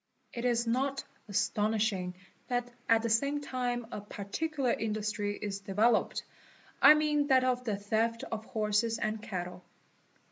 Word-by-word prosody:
It 235 0 -4
is 235 -1 +2
not 265 +4 0 0.2
astonishing 210 -3 0 0.3
that 245 -1 -1 0.2
at 225 0 +5
the - - +1
same 280 +6 +2
time 245 -4 -2
a - - -5
particular 250 +7 -2
industry 210 -1 -2
is 200 -1 -4
developed, 210 +4 +2 0.6
I 305 - +10
mean 300 -1 +2
that 260 -2 +5
of 250 -1 0
the 210 -4 -1
theft 225 +3 0
of 220 -1 -4
horses 220 +1 0
and 215 -1 -2
cattle. 180 -3 -5
225 Hz, 140 wpm, -31 LUFS, 210-250 Hz, 0.6 s, I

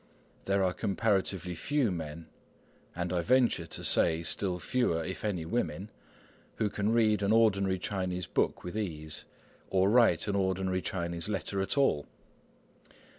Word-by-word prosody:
There 100 0 +2
are 90 -1 +1
comparatively 95 -4 0
few 135 - 0
men, 80 -1 -6 0.7
and 90 0 -2
I 90 - +1
venture 120 -6 +2
to - - -5
say 80 0 +3
still 90 +2 0
fewer, 90 -4 0
if 95 +3 -6
any, 95 -6 -2
women, 105 +1 -2 0.6
who 105 -2 -1
can 105 +1 0
read 110 -3 +3
an 100 +1 +1
ordinary 100 -4 +3
Chinese 90 -1 -3
book - - -1
with 90 +3 -6
ease, 80 -8 -4 0.4
or 95 +1 +3
write 115 -8 +4
an 100 - 0
ordinary 95 -1 0
Chinese 85 0 -3
letter 100 -1 -2
at 95 - -2
all. 105 - +2
95 Hz, 145 wpm, -30 LUFS, 85-105 Hz, 0.7 s, write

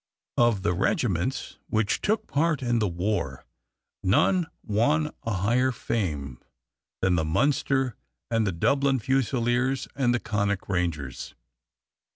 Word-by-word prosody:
Of 120 -5 +3
the 90 - +2
regiments 100 - -1
which 110 -2 0
took 215 +1 0
part 155 -1 0
in 120 -1 +1
the 105 - +1
war 90 +1 -2 0.6
none 170 - +3 0.2
won 145 +9 +2
a 115 - -3
higher 120 +7 +2
fame 75 - -3 0.6
than 95 -1 +3
the 80 -2 +2
Munster 135 - +1 0.4
and 115 -2 +2
the - - +1
Dublin 135 +10 +2
Fusiliers 130 +1 0
and 130 -3 +2
the 120 - +1
Connaught 100 -3 -1
Rangers. 85 -8 -3
115 Hz, 125 wpm, -26 LUFS, 95-135 Hz, 0.6 s, Of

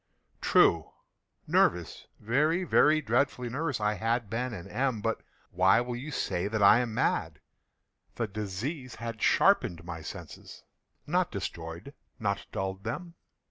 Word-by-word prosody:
True!—nervous—very, 115 - +1
very 155 -3 +4
dreadfully 125 +1 0
nervous 140 +1 -2
I 105 0 +1
had 115 +1 -1
been 125 +3 -2
and 90 -7 -7
am; 130 -4 -1
but 115 +2 -2 0.3
why 95 +5 +4
will 120 0 -3
you 130 +5 -6
say 95 -9 -2
that 105 0 0
I 105 +3 +8
am 120 -2 -1
mad? - - 0 0.8
The 115 - -1
disease 110 - -5
had 115 -1 -6
sharpened 85 -1 +3
my 85 -2 -6
senses—not - - -5
destroyed—not 100 - -5
dulled 95 0 -4
them. 170 +10 -5
115 Hz, 120 wpm, -29 LUFS, 95-125 Hz, 0.8 s, I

